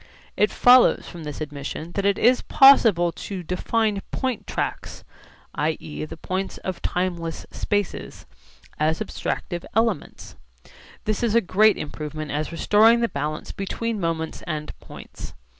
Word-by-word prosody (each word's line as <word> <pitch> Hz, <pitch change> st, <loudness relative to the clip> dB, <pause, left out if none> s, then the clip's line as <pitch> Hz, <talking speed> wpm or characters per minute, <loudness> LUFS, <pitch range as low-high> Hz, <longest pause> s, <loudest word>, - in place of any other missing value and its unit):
It 210 Hz, -, +3 dB
follows 250 Hz, 0 st, +5 dB
from 170 Hz, -3 st, -9 dB
this 150 Hz, +1 st, -6 dB
admission 150 Hz, +2 st, -6 dB
that 200 Hz, +2 st, -2 dB
it 200 Hz, -, +2 dB
is 250 Hz, +2 st, +4 dB
possible 225 Hz, -11 st, +6 dB
to 185 Hz, +1 st, -7 dB
define 205 Hz, +4 st, 0 dB
point 245 Hz, -6 st, -3 dB
tracks -, -, -4 dB, 0.5 s
[i.e. 155 Hz, 0 st, -3 dB
the 155 Hz, -, -9 dB
points 190 Hz, +3 st, -4 dB
of 185 Hz, -2 st, -4 dB
timeless 175 Hz, -2 st, -2 dB
spaces] 205 Hz, -2 st, -3 dB, 0.5 s
as 155 Hz, +1 st, +1 dB
abstractive 175 Hz, -1 st, -4 dB
elements. 225 Hz, -8 st, -1 dB, 0.7 s
This 215 Hz, -1 st, -1 dB
is 230 Hz, -2 st, +1 dB
a -, -, +7 dB
great 215 Hz, +2 st, +3 dB
improvement 155 Hz, 0 st, -6 dB
as 150 Hz, +2 st, -2 dB
restoring 220 Hz, +7 st, +4 dB
the 235 Hz, -, +1 dB
balance 150 Hz, +2 st, -4 dB
between 220 Hz, +3 st, -3 dB
moments 165 Hz, -2 st, -3 dB
and 150 Hz, -2 st, -4 dB
points. -, -, -11 dB
185 Hz, 135 wpm, -23 LUFS, 155-215 Hz, 0.7 s, a